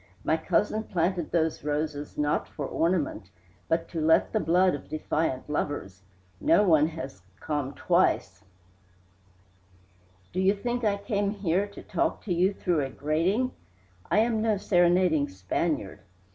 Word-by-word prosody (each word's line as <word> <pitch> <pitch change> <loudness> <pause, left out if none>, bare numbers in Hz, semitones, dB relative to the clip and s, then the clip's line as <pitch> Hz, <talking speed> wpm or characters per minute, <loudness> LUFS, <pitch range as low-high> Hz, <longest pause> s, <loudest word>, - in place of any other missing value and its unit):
My 160 - +2
cousin 190 +6 0
planted 175 -1 -1
those 160 -2 0
roses 150 0 -3
not 150 0 0
for 145 - -6
ornament, 160 - -1 0.4
but 165 0 0
to 165 - -3
let 160 +1 +3
the 220 - +2
blood 180 +1 +3
of 145 - -7
defiant 155 -3 -2
lovers. 145 -11 -3 0.4
Not 295 -9 +4
one 155 -4 +5
has 140 - -7 0.2
come 145 -3 -3
twice - - +1 1.1
" 90 0 -33
"Do 185 - -1
you 195 +2 +3
think 240 +4 -3
I 205 -2 +2
came 200 -1 -1
here 200 -1 0
to 200 - -12
talk - - -1
to 190 - -1
you 180 +3 +3
through 175 -5 0
a 135 - -3
grating? 170 - 0 0.6
I - - +2
am 225 -1 +1
no 220 -2 +2
serenading 175 -5 +3
Spaniard." 95 - -2
165 Hz, 145 wpm, -27 LUFS, 145-195 Hz, 1.1 s, one